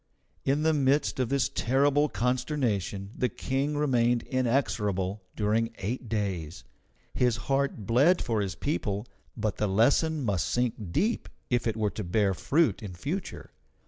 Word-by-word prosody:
In 140 +3 +2
the 160 0 +3
midst 140 -1 +2
of 125 -3 0
this 135 -2 +2
terrible 140 +4 +2
consternation 120 - -1
the 125 - 0
King 135 +6 -2
remained 120 -5 +2
inexorable 105 -7 0
during 115 +2 0
eight 115 +4 -4
days. 95 -7 -3 0.5
His 125 -2 +2
heart 135 -6 0
bled 140 - +4
for 115 -4 0
his 95 -2 -3
people, 105 -7 -2 0.3
but 110 -1 -1
the 105 - +1
lesson 140 +9 +2
must 95 -6 0
sink 110 -5 -1
deep 220 - 0 0.2
if 120 -1 +1
it 115 -1 -1
were 105 -2 0
to 105 - -5
bear 95 +2 +1
fruit 155 - +1
in 100 -4 -6
future. 155 - -5
120 Hz, 145 wpm, -28 LUFS, 105-140 Hz, 0.5 s, bled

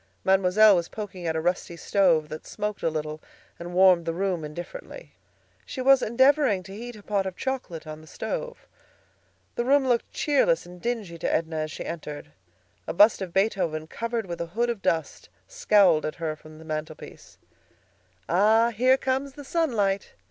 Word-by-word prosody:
Mademoiselle 195 +2 +5
was 170 -1 -1
poking 190 -5 -6
at 160 - -1
a - - 0
rusty 175 0 -2
stove 170 -5 +2
that 155 +1 -8
smoked 210 0 -4
a 165 - +1
little 155 0 -4 0.4
and 175 +1 -7
warmed 185 -2 +6
the 165 - -1
room 185 -3 -1
indifferently. 175 - -9 0.5
She - - -8
was 265 0 +5
endeavoring 260 -4 +3
to 195 +2 -10
heat 240 +2 -8
a 210 - -13
pot 200 -2 -1
of 185 - -6
chocolate 250 -12 -4
on 155 0 -8
the 155 - -16
stove. - - -5 0.9
The 240 - -1
room 270 +1 +3
looked 240 -2 0
cheerless 310 - +2
and 180 0 -13
dingy 220 -8 -3
to - - -1
Edna 160 0 -1
as 155 0 -3
she - - -7
entered. 150 - -7 0.6
A - - -2
bust 205 +4 +5
of 185 -2 -4
Beethoven, 185 -5 0
covered 230 +5 -3
with 170 -2 -6
a 170 - -3
hood 240 0 +2
of 225 -4 -6
dust, 160 -3 -2 0.2
scowled 205 - +3
at 155 - -5
her 160 -2 -3
from 155 0 -15
the 160 - -13
mantelpiece. 155 0 -7 0.9
"Ah! 220 +6 +4
here 255 +4 +3
comes 265 +1 -2
the 290 - -10
sunlight!" 220 - 0
195 Hz, 175 wpm, -26 LUFS, 165-235 Hz, 0.9 s, warmed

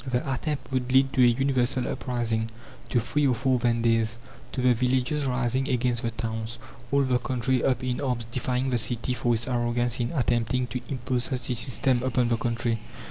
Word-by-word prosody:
The 125 +1 -1
attempt 145 +2 -3
would 130 -1 -1
lead 135 +1 +4
to 130 - +3
a 125 - +8
universal 130 0 +1
uprising, 115 -3 -2 0.4
to 120 - +2
three 140 +5 +1
or 125 - +2
four 130 +1 +1
Vendées, 115 -1 +1 0.3
to - - -4
the 125 0 +4
villages 130 +4 0
rising 130 +2 0
against 120 -1 +1
the 115 - -1
towns, 115 0 -4 0.3
all 140 0 +3
the 130 -2 +2
country 125 +1 0
up 130 -1 +1
in 125 +1 -2
arms 125 -4 -1
defying 125 +2 -1
the 120 - +3
city 120 +2 +1
for 120 -1 +1
its 115 +2 -2
arrogance 120 0 0
in 120 0 -1
attempting 125 -2 +1
to 125 +1 -5
impose 125 -2 -1
such 130 0 -2
a - - 0
system 125 +1 +2
upon 125 -1 +1
the 115 - +2
country. 115 -1 -1
125 Hz, 190 wpm, -26 LUFS, 120-130 Hz, 0.4 s, a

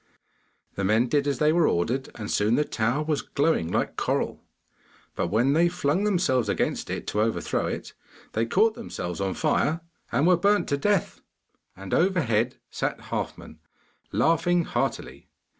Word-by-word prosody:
The 100 - -3
men 110 +5 +2
did 145 +1 +1
as 140 -2 0
they 150 +1 +3
were 170 -2 +4
ordered, 120 +11 0
and 105 -2 -5
soon 105 +3 +2
the 150 - +2
tower 120 +6 0
was 150 -4 -1
glowing 140 - 0
like - - -1
coral, - - -1 0.7
but - - -1
when 115 +9 +2
they 170 +3 +4
flung 180 +2 0
themselves 130 - +1
against 100 - -1
it - - -4
to 105 - -1
overthrow 110 +1 0
it, - - -5 0.4
they 115 +1 0
caught 215 - +3
themselves 100 - -5
on 95 -1 -1
fire 155 +1 +1 0.3
and 145 - +2
were 180 0 +5
burnt 205 +4 +2
to 140 - +2
death. 200 +5 0 0.6
And 95 0 -7
overhead 130 - +2 0.2
sat - - -4
Halfman, - - -5 0.5
laughing 170 +2 +2
heartily. - - -3
140 Hz, 160 wpm, -26 LUFS, 110-170 Hz, 0.7 s, were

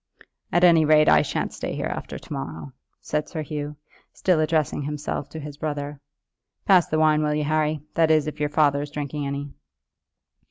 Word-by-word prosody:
"At 175 +1 +2
any 170 -3 +7
rate 155 0 +5
I - - +6
shan't - - -2
stay - - -4
here - - -3
after - - -5
to - - -9
morrow," 80 0 -6 0.3
said 150 0 -2
Sir 160 -3 -4
Hugh, 150 0 -5 0.4
still 180 -4 +1
addressing 155 -2 +1
himself 145 -1 -4
to 160 - -7
his 145 -1 -8
brother. 145 -1 -4 0.7
"Pass 185 -4 +5
the 155 - -1
wine, 155 -1 +4
will 150 0 +1
you, 150 - 0
Harry; 155 0 0
that 165 -2 +3
is, 155 -2 +4
if 155 - -6
your 150 0 0
father 145 -1 +2
is 145 - -5
drinking 145 0 -4
any." 140 0 -5
150 Hz, 190 wpm, -24 LUFS, 145-155 Hz, 0.7 s, any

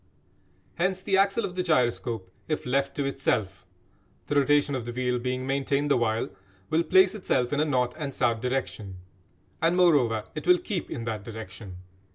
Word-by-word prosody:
Hence 185 +1 0
the 195 - +1
axle 195 +3 +3
of 180 - -5
the 185 - -1
gyroscope 120 - 0 0.2
if 155 - -2
left 135 +2 0
to 140 - -1
itself 100 -9 -1 0.6
(the 145 - -2
rotation 145 +1 +3
of 130 -4 -3
the - - -3
wheel 125 0 -1
being 130 +1 -2
maintained 140 +1 0
the - - +5
while) 115 -2 0 0.4
will 160 +1 +3
place 190 +2 +5
itself 150 - 0
in 145 - +1
a 155 - +3
north 125 -4 +1
and 145 -2 -3
south 115 -4 0
direction. 125 -6 -3 0.7
And, 165 +2 +2
moreover, 135 -12 +4
it 155 +3 -6
will 180 0 +7
keep 180 -2 -4
in 115 - -5
that 110 -3 -4
direction. 100 -3 -9
135 Hz, 180 wpm, -27 LUFS, 115-155 Hz, 0.7 s, will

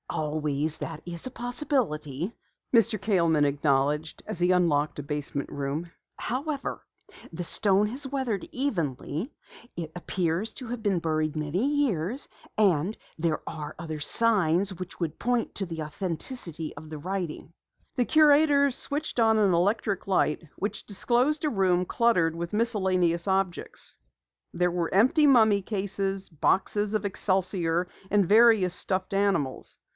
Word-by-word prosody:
"Always 150 0 -1
that 160 -1 -6
is 170 -1 -6
a 255 - -5
possibility," 230 - -2 0.4
Mr. 230 -1 +3
Kaleman 170 -7 +2
acknowledged 145 +2 0
as - - -5
he 180 +1 +3
unlocked 155 -5 +2
the 145 - -6
door - - -15
of 145 - -10
a - - +1
basement 145 -1 -4
room. 145 +4 -4 0.3
"However, 275 +4 -3 0.5
the 175 +2 -5
stone 200 +3 +3
has 265 +5 -2
weathered 260 -8 -2
evenly, 170 - -2 0.5
it 165 -2 -5
appears 180 +3 -2
to 255 - -7
have 235 -1 -5
been 195 -4 +1
buried 155 -1 -1
many 155 +7 -1
years, 265 - 0 0.3
and 195 -1 +2 0.2
there 160 -1 0
are 150 -1 -6
other 160 -2 -5
signs 195 -1 +2
which 185 -1 -8 0.2
point 245 -1 0
to 195 - -2
the 165 -3 -5
authenticity 165 - -5
of 155 - -10
the 155 - -6
writing." 175 0 -5 0.4
The 250 - +2
curator 290 -1 +5
switched 285 +1 -3
on 225 -1 +4
an 200 -4 +3
electric 200 +3 0
light 180 -4 +1
which 205 +1 -3
disclosed 250 +9 +1
a - - +2
room 185 -5 +2
cluttered 180 -8 +2
with 170 +2 -5
miscellaneous 190 -6 +1
objects. 190 -2 -2 0.6
There 180 0 +1
were 170 -1 -2
empty 260 - +5
mummy 220 -6 +5
cases, 195 -1 -2
boxes 200 +6 0
of 215 - -1
excelsior, 185 -3 0 0.2
and 200 -3 +3
various 215 -4 +5
stuffed 185 +1 -2
animals. 195 -9 0
190 Hz, 140 wpm, -27 LUFS, 160-225 Hz, 0.6 s, curator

